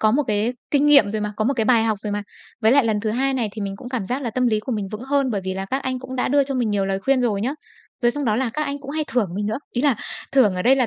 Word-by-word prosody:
có 215 Hz, -, +4 dB
một 275 Hz, +7 st, +2 dB
cái 215 Hz, +1 st, +1 dB, 0.2 s
kinh 290 Hz, 0 st, +3 dB
nghiệm 280 Hz, -9 st, +6 dB
rồi 215 Hz, 0 st, -2 dB
mà, 210 Hz, 0 st, -2 dB
có 215 Hz, -, 0 dB
một 275 Hz, +5 st, +1 dB
cái 225 Hz, -3 st, 0 dB
bài 230 Hz, -1 st, +4 dB
học 215 Hz, -3 st, 0 dB
rồi 210 Hz, -1 st, -3 dB
mà. 205 Hz, 0 st, -2 dB, 0.4 s
Với 220 Hz, 0 st, +4 dB
lại 275 Hz, -2 st, +5 dB
lần 215 Hz, -2 st, +1 dB
thứ 215 Hz, 0 st, -1 dB
hai 265 Hz, +4 st, +1 dB
này 235 Hz, -5 st, 0 dB
thì 215 Hz, -, -5 dB
mình 195 Hz, -1 st, -4 dB
cũng 245 Hz, +4 st, -9 dB
cảm 245 Hz, -7 st, -3 dB
giác 255 Hz, +3 st, -2 dB
là 240 Hz, -, -2 dB
tâm 250 Hz, +3 st, +1 dB
lý 215 Hz, -3 st, +2 dB
của 250 Hz, +4 st, -4 dB
mình 205 Hz, -3 st, -2 dB
vững 215 Hz, -, -5 dB
hơn, 275 Hz, 0 st, +1 dB
bởi 205 Hz, -4 st, -1 dB
vì 190 Hz, 0 st, -2 dB
là 195 Hz, 0 st, -4 dB
các 265 Hz, +1 st, -1 dB
anh 255 Hz, -1 st, -2 dB
cũng 260 Hz, 0 st, -7 dB
đã 250 Hz, -, 0 dB
đưa 285 Hz, +1 st, +3 dB
cho 270 Hz, 0 st, -4 dB
mình 240 Hz, -4 st, 0 dB
nhiều 200 Hz, -1 st, 0 dB
lời 195 Hz, 0 st, -1 dB
khuyên 270 Hz, +5 st, +2 dB
rồi 215 Hz, -5 st, +1 dB
nhá. 265 Hz, +5 st, -1 dB, 0.5 s
Rồi 240 Hz, -, +5 dB
xong 290 Hz, +3 st, -3 dB
đó 215 Hz, -3 st, +2 dB
là 250 Hz, -1 st, 0 dB
các 305 Hz, -, 0 dB
anh 280 Hz, 0 st, -4 dB
cũng 275 Hz, 0 st, -8 dB
hay 310 Hz, +1 st, -1 dB
thưởng 235 Hz, -7 st, +1 dB
mình 205 Hz, +1 st, -2 dB
nữa, 220 Hz, +3 st, -1 dB
ý 245 Hz, -, -1 dB
là 285 Hz, -5 st, +3 dB, 0.4 s
thưởng 250 Hz, -8 st, +4 dB
ở 180 Hz, -, -2 dB
đây 260 Hz, +5 st, +5 dB
là 255 Hz, -2 st, +2 dB
240 Hz, 355 wpm, -22 LUFS, 210-265 Hz, 0.5 s, nghiệm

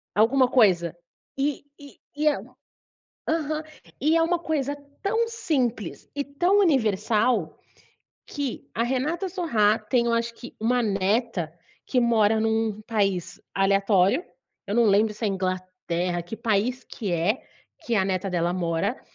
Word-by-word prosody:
alguma 250 Hz, +5 st, +4 dB
coisa. 180 Hz, -9 st, +3 dB, 0.4 s
E 280 Hz, 0 st, -1 dB, 0.2 s
e 285 Hz, -1 st, -13 dB, 0.2 s
e 305 Hz, +1 st, +1 dB
é 295 Hz, -, +4 dB, 0.9 s
aham. 310 Hz, -1 st, 0 dB, 0.4 s
E 310 Hz, +4 st, +3 dB
é 330 Hz, -, +4 dB
uma 345 Hz, +1 st, +2 dB
coisa 290 Hz, -4 st, -2 dB, 0.3 s
tão 450 Hz, +3 st, +1 dB
simples 255 Hz, -, -2 dB
e 285 Hz, -, -1 dB
tão 355 Hz, +9 st, +2 dB
universal, 220 Hz, -, +2 dB, 0.7 s
que 285 Hz, -4 st, -5 dB
a 230 Hz, -, +1 dB
Renata 295 Hz, +9 st, -1 dB
Sorrah 230 Hz, -, +2 dB
tem, 235 Hz, +2 st, +1 dB
eu 235 Hz, -, +1 dB
acho 230 Hz, 0 st, 0 dB
que, 245 Hz, -, -11 dB
uma 245 Hz, +2 st, +2 dB
neta, 200 Hz, -3 st, 0 dB, 0.3 s
que 255 Hz, -, +1 dB
mora 225 Hz, -2 st, +3 dB
em 220 Hz, 0 st, +1 dB
um 220 Hz, -1 st, 0 dB
país 195 Hz, -6 st, -1 dB
aleatório, 195 Hz, -, +3 dB, 0.4 s
eu 205 Hz, -, -1 dB
não 240 Hz, -, +5 dB
lembro 210 Hz, +1 st, +3 dB
se 215 Hz, +1 st, -4 dB
é -, -, +2 dB
Inglaterra, 185 Hz, -2 st, -2 dB
que 180 Hz, +6 st, -8 dB
país 230 Hz, +4 st, 0 dB
que 205 Hz, -6 st, -5 dB
é 180 Hz, -, +1 dB, 0.4 s
que 235 Hz, -, 0 dB
a 190 Hz, -2 st, +3 dB
neta 190 Hz, 0 st, -1 dB
dela 175 Hz, 0 st, 0 dB
mora, 180 Hz, +6 st, -1 dB
225 Hz, 145 wpm, -25 LUFS, 195-275 Hz, 0.9 s, não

